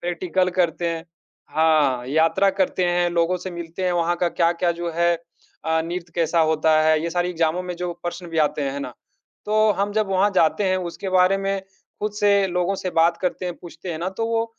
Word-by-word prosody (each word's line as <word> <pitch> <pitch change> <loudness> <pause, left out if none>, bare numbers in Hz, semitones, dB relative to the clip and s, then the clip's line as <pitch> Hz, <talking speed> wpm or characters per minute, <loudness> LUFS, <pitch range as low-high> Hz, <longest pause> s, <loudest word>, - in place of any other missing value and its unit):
Practical 180 +1 0
करते 170 -1 +1
हैं 165 -1 -4 0.5
हाँ, 150 -6 +3
यात्रा 165 +7 +3
करते 190 -1 0
हैं, 175 0 +2
लोगों 170 +1 +1
से 185 +1 -6
मिलते 170 +1 -6
हैं, 180 - +1
वहाँ 175 0 +1
का 175 0 +1
क्या-क्या 170 +1 +1
जो 170 0 -4
है 170 0 +3 0.5
अ, 160 0 +1
नृत्य 170 0 -6
कैसा 165 0 +1
होता 155 0 +3
है। 155 0 +3
ये 170 - -2
सारे 175 0 0
एग्ज़ामों 165 +1 0
में 180 0 -5
जो 175 0 -3
प्रश्न 175 0 -5
भी 165 -1 -3
आते 145 - -4
हैं 140 +1 -4
ना, 125 -3 -6 0.5
तो 215 0 +3
हम 205 +1 0
जब 215 -1 0
वहाँ 195 +2 +3
जाते 165 +5 +3
हैं, 185 -1 +2 0.2
उसके 195 - -6
बारे 185 +2 +4
में 195 0 -1 0.4
खुद 210 0 -2
से 200 -1 +4
लोगों 180 +2 0
से 185 - -1
बात 170 +1 +3
करते 185 0 -2
हैं, 175 - -3
पूछते 175 +1 -8
हैं 160 - -5
ना 175 - -2
तो 225 - 0
वो 230 0 0
175 Hz, 215 wpm, -22 LUFS, 165-185 Hz, 0.5 s, बारे